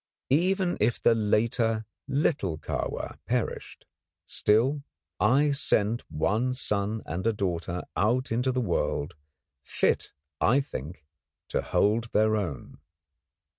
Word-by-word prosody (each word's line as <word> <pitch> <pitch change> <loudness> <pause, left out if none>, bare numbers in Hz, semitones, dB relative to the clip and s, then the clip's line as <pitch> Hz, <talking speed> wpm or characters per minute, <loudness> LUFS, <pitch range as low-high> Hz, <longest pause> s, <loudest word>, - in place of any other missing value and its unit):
Even 180 +4 +2
if 120 - +2
the - - +4
later 110 +1 +1 0.2
little 135 - 0
Kahwa - - -4
perished, - - -3 0.4
still, 125 +8 +2 0.4
I 140 +7 +4
sent 115 -5 +1
one 105 +11 0
son 105 -2 -1
and 90 +6 -3
a - - +4
daughter 90 -3 -2
out 120 +6 +1
into 125 +3 +1
the 130 0 0
world, 85 -5 -1 0.5
fit - - 0 0.3
I 125 +5 +4
think, 75 - -6 0.4
to - - 0
hold 110 +3 +2
their 110 +1 +3
own. 90 -10 -4
110 Hz, 115 wpm, -27 LUFS, 100-130 Hz, 0.5 s, the